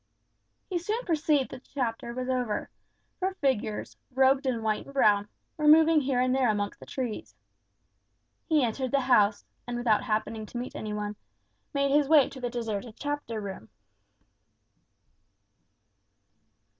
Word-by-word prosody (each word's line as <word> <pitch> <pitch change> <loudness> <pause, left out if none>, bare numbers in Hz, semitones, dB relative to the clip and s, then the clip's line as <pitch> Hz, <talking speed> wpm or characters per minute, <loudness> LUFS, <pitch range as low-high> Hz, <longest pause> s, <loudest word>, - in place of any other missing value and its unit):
He 360 -3 -1
soon 435 +8 -3
perceived 305 -4 +1
that 260 0 -9
the - - -28
Chapter 235 -3 -2
was 255 +1 -4
over; 250 -5 -1 0.5
for 375 0 -1
figures, 255 - -1 0.2
robed 265 +1 +4
in 235 -3 -1
white 215 -1 -1
and 275 - -12
brown, 205 -5 +4 0.3
were 300 -1 +1
moving 315 0 +7
here 265 -2 0
and 255 0 +2
there 260 -3 +3
amongst 205 -1 -1
the - - -12
trees. 245 -5 -5 1.1
He 310 -4 +4
entered 250 +3 -1
the 275 +2 +2
house, 215 -5 +3 0.2
and 240 0 -3
without 230 -3 +2
happening 220 -1 -2
to 240 - -7
meet 245 +1 -5
any 215 - -5
one, 210 0 -4 0.5
made 280 0 +1
his 290 0 +3
way 305 -4 +6
to 260 - -10
the 245 - -1
deserted 225 -2 -4
Chapter 290 -6 -3
room. 190 - -7
255 Hz, 150 wpm, -28 LUFS, 220-280 Hz, 1.1 s, moving